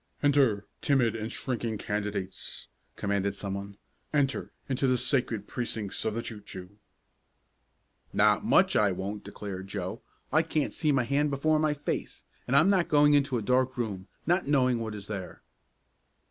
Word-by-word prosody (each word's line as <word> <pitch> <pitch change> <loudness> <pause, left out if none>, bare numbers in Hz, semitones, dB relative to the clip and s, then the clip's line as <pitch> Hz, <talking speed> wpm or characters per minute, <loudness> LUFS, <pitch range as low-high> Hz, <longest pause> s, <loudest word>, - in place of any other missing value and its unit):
"Enter, 135 -8 +3 0.2
timid 125 -6 +2
and 110 0 -4
shrinking 115 -4 -2
candidates," 100 -2 -4 0.3
commanded 100 -1 -1
some 100 -1 -4
one. 100 0 -6 0.3
"Enter 140 -3 0 0.2
into 135 0 +1
the 130 -1 +3
sacred 120 -6 0
precincts 110 -5 -2
of 110 -1 0
the 115 - -2
Choo 110 -3 -5
Choo." 95 0 -9 1.3
"Not - - +4
much - - +4
I 105 -2 +4
won't!" 100 +3 -4
declared 95 -2 -7
Joe. 95 -2 -4 0.3
"I 155 - +6
can't 160 -2 -1
see 155 - +1
my 130 -3 +3
hand 140 +4 +1
before 155 +3 +2
my 155 -1 +2
face, 145 - -4 0.2
and 125 - +1
I'm 155 +8 +6
not 185 -3 +3
going 145 0 +5
into 140 -3 +3
a 110 - -3
dark 130 +3 +2
room, 100 -5 -3 0.2
not 175 +1 +2
knowing 130 -4 +3
what 110 -2 -4
is 100 -2 -7
there." 100 -3 -6
115 Hz, 160 wpm, -29 LUFS, 100-140 Hz, 1.3 s, I